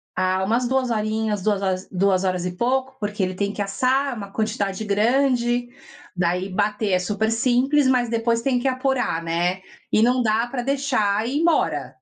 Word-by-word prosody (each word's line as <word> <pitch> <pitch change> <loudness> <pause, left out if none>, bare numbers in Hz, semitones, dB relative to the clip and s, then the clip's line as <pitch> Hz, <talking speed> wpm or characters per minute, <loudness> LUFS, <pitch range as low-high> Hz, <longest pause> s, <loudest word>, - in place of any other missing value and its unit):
ah 185 +1 +1
umas 235 +5 +1
2 260 0 0
horinhas, 215 -1 -1
duas 195 -3 -1
duas 190 0 +2
horas 185 -2 -1
e 180 - -2
pouco 260 +4 -1
porque 205 -1 -2
ele 185 0 -2
tem 200 +2 -2
que 205 - -4
assar, 255 +6 0
uma 200 -2 -8
quantidade 215 -2 -2
grande, 240 +3 +1 0.5
daí 180 +2 0
bater 205 +2 -1
é 180 - +3
super 210 +4 -1
simples 260 +4 +2
mas 250 -2 +2
depois 230 0 0
tem 250 0 +1
que 270 - -1
apurar, 255 -9 0
né, 175 +3 -1 0.3
e 215 - +3
não 250 +2 +3
dá 225 +1 +1
para 245 0 -4
deixar 245 -6 0
ir 275 +4 -1
embora. 150 - +1
220 Hz, 175 wpm, -22 LUFS, 195-250 Hz, 0.5 s, é